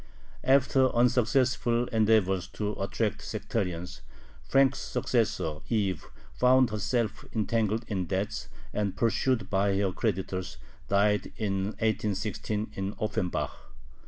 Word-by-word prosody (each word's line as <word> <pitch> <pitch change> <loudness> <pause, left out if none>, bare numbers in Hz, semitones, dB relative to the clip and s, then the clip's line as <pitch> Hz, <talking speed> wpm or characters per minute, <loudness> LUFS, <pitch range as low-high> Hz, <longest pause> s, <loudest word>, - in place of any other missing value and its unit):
After 135 0 +4
unsuccessful 120 0 +2
endeavors 105 -4 +2
to 105 -1 -2
attract 100 - -1
sectarians, 90 -5 -3 0.4
Frank's 135 -1 +3
successor, 110 -10 0
Eve, 100 -7 0 0.3
found 130 -1 +4
herself 110 +1 -1
entangled 110 0 0
in 95 -4 -2
debts, 100 +3 -2 0.2
and, 105 -2 -1
pursued 115 -2 +1
by 100 0 +2
her 100 -1 +1
creditors, 95 -3 -2 0.3
died 105 +1 +2
in 95 -3 -1
1816 105 0 -1
in 95 +1 -4
Offenbach. 105 -4 -1
105 Hz, 100 wpm, -28 LUFS, 95-115 Hz, 0.4 s, After